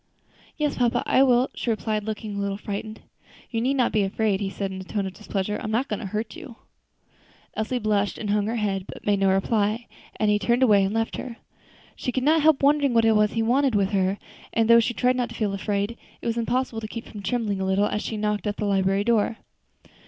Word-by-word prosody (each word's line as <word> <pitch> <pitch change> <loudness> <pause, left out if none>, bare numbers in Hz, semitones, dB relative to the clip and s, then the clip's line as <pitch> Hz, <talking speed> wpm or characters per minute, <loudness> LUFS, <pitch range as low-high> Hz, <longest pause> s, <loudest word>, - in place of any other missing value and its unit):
"Yes, 295 -2 -1
papa, 240 -2 +1
I 260 - +4
will," 255 -1 +4
she - - -4
replied, 215 -1 -1
looking 215 -1 -4
a - - -3
little 200 0 -2
frightened. 210 +1 -6 0.5
"You 225 -2 -1
need 265 +4 +1
not 250 -3 +2
be 215 - +2
afraid," 200 0 0
he 195 - -1
said, 195 0 -4
in 190 0 -6
a - - -7
tone 200 +1 -3
of 190 - -5
displeasure; 210 0 -3
"I - - -8
am - - -3
not 235 +5 0
going 210 - -2
to 205 - -5
hurt 215 - -4
you." 310 -9 -10 1.0
Elsie 220 +4 -2
blushed 210 -3 0
and 210 -2 -3
hung 210 0 +1
her 230 - -1
head, 195 -4 -1
but - - -12
made 205 -1 +2
no 195 0 +3
reply, 210 +4 +1 0.3
and 215 -1 +1
he 205 - +2
turned 240 +4 +2
away 205 -5 +5
and 195 - 0
left 225 +1 -1
her. 240 -3 -6 0.6
She 250 - -3
could 255 0 -1
not 315 +3 +4
help 305 -2 +4
wondering 285 -3 +3
what 230 - +5
he 220 0 +3
wanted 255 +1 +2
with 200 -1 +2
her, 195 0 +1 0.4
and 225 -1 +2
though 235 0 +8
she 235 +1 0
tried 250 0 +2
not 245 -2 -1
to 230 - -9
feel 210 -3 -1
afraid, 200 +3 -2 0.2
it - - -13
was 230 -1 0
impossible 235 0 -1
to 215 - -5
keep 230 +1 -7
from 210 - -9
trembling 210 -3 -1
a - - 0
little 190 +2 +2
as 210 - -1
she 220 - -4
knocked 210 0 -1
at 205 - -2
the 210 - -2
library 195 0 +2
door. 225 -1 +1
215 Hz, 240 wpm, -25 LUFS, 200-235 Hz, 1.0 s, though